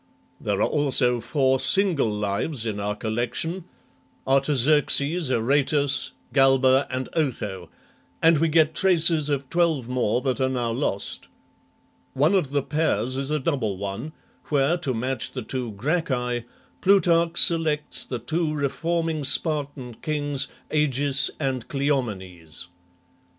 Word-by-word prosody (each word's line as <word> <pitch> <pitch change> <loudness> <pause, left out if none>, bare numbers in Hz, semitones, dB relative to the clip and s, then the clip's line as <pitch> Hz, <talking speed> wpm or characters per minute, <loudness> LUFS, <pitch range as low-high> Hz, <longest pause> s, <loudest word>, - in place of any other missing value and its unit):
There 100 -2 -2
are - - +3
also 130 -4 +1
four 130 +2 +1
single 180 - +2
Lives 105 +5 -2
in 105 -2 -3
our 105 +1 -2
collection, 120 - -3 0.6
Artaxerxes, 145 +3 +2
Aratus, 140 +3 +2 0.2
Galba, 135 0 +4
and 130 0 -3
Otho, 105 - -2 0.5
and 165 -2 +4
we 165 - +2
get 160 0 +3
traces 165 -4 +3
of 140 -2 -1
twelve 165 -8 +1
more 125 -2 0
that 135 0 -1
are 130 - +2
now 120 -3 -1
lost. 115 -5 -2 0.9
One 150 +7 +3
of 185 -8 +1
the 140 -1 0
pairs 130 -6 -1
is 135 +1 -3
a 155 - +1
double 130 - -1
one, 100 +10 -5 0.3
where, 145 +2 +2
to 165 -6 -2
match 130 +2 -3
the 130 - -5
two 125 -2 -4
Gracchi, 125 - -1 0.4
Plutarch 170 -3 +3
selects 155 -3 +2
the 125 - -5
two 155 +6 -1
reforming 160 +2 -1
Spartan 140 -3 -1
kings, 145 -3 -1 0.2
Agis 140 -2 +2
and 130 -5 -2
Cleomenes. 95 - -3
135 Hz, 125 wpm, -24 LUFS, 125-155 Hz, 0.9 s, Galba